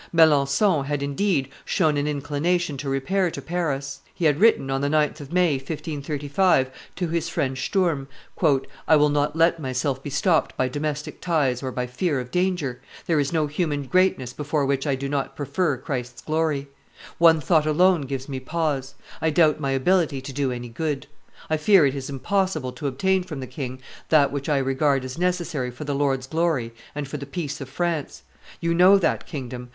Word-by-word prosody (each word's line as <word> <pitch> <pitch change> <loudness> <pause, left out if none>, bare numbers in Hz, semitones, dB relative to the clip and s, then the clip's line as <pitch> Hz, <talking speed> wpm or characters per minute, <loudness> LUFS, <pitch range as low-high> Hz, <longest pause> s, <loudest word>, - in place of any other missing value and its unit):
Melancthon 155 +1 +4
had, 145 0 -2
indeed, 140 0 0 0.2
shown 155 -2 +1
an 145 0 0
inclination 150 +3 -1
to 135 +1 -4
repair 175 +8 +1
to - - -6
Paris; 145 -6 -3 0.2
he 170 - -2
had 150 -1 +3
written, 205 -11 +4
on 135 0 0
the 140 - +1
9th 150 0 +1
of 145 0 -9
May, 175 -5 +3
1535, 145 0 0 0.2
to 180 - -2
his 170 0 -1
friend 130 -1 -1
Sturm, 150 0 0 0.8
"I 160 - +6
will 150 0 +4
not 145 +1 0
let 165 +1 +3
myself 130 -1 -2
be 145 - -6
stopped 160 +3 +1
by 130 - +1
domestic 150 +2 -4
ties 145 -8 +1
or 130 -1 -3
by 125 0 -2
fear 135 +4 -1
of 125 0 -7
danger. 180 -9 -1 0.2
There 165 -3 +2
is 140 -1 0
no 160 -2 +1
human 150 -1 -1
greatness 135 -5 +1
before 150 -1 -1
which 135 +1 0
I 140 - +2
do 140 +1 -4
not 140 -1 -2
prefer 150 0 0
Christ's 125 -3 -5
glory. 155 -3 0 0.5
One 165 -1 +6
thought 155 +1 +2
alone 175 +2 +4
gives 135 0 -4
me 135 -2 -4
pause: 140 -2 -2 0.3
I 160 - +2
doubt 155 -1 +3
my 140 -2 -2
ability 140 +2 +2
to 135 +1 -7
do 135 -1 0
any 120 -1 -5
good; 145 +3 -3 0.4
I 155 - +1
fear 170 +1 +5
it 135 - +1
is 135 -1 -5
impossible 155 -1 -1
to 145 +2 -5
obtain 190 +8 +1
from 170 -6 -7
the 130 - -5
king 130 0 -6 0.3
that 145 -3 +5
which 140 +1 -4
I 145 - +3
regard 135 0 +1
as 130 +5 -6
necessary 175 -7 -1
for 125 +4 -8
the 145 -1 -2
Lord's 135 -2 0
glory 150 -6 0 0.2
and 145 -1 -3
for 150 - -5
the 140 -1 -7
peace 150 -2 -4
of 135 - -7
France. 170 -1 -2 0.4
You 170 0 0
know 185 +4 +7
that 195 - 0
kingdom. 125 -4 -6
145 Hz, 190 wpm, -24 LUFS, 135-165 Hz, 0.8 s, know